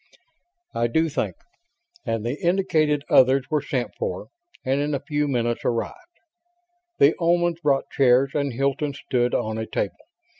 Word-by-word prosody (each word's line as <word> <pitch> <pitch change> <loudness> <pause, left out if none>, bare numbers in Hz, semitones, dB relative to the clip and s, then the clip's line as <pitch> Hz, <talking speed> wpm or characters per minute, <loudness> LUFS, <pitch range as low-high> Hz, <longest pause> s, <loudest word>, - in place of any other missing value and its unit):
"I 120 - +1
do 160 +7 +1
think;" 150 - -2 0.7
and 115 -1 -2
the 125 +5 -3
indicated 160 -5 +1
others 130 +1 +5
were 150 -1 +2
sent 130 -3 -3
for; 485 0 -4 0.4
and 135 +2 +1
in 145 0 -1
a - - -2
few 150 +1 -1
minutes 120 -3 -1
arrived. 115 -1 -1 1.0
The 145 +3 +5
Omans 175 0 +1
brought 140 -3 +1
chairs 135 0 +3
and 140 -2 -1
Hilton 140 +3 -1
stood 125 -3 -1
on 110 0 -2
a 110 - -4
table. - - -3
140 Hz, 150 wpm, -23 LUFS, 125-150 Hz, 1.0 s, others